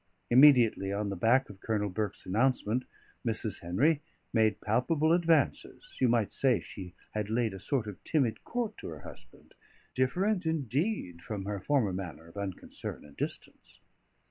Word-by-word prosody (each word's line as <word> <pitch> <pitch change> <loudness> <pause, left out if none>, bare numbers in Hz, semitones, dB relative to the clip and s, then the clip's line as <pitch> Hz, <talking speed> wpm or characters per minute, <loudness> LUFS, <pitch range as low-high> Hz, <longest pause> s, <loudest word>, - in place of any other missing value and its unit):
Immediately 120 -7 +6
on 100 +1 -1
the 100 - -3
back 120 +8 +3
of 100 -2 -12
Colonel 105 -2 -1
Burke's 105 0 -3
announcement 120 +3 +1 0.4
Mrs. 110 -3 -1
Henry 140 - +2 0.3
made 110 -2 +3
palpable 150 +9 +2
advances; 165 -5 +1
you 125 - +5
might 115 -3 +1
say 125 -7 +3
she 90 +1 -9 0.2
had 105 -1 -3
laid 115 -2 +1
a 95 - -7
sort 125 +4 0
of 105 -3 -8
timid 125 -9 0
court 235 -3 -3
to - - -7
her 75 -3 -8
husband, - - -13 0.4
different, 180 +9 +1
indeed, 145 - -1
from 100 0 -5
her 100 0 -3
former 110 -1 +1
manner 85 -4 -6
of 85 - -16
unconcern 100 -6 -6
and 75 -1 -16
distance. - - -6
110 Hz, 155 wpm, -30 LUFS, 100-140 Hz, 0.4 s, Immediately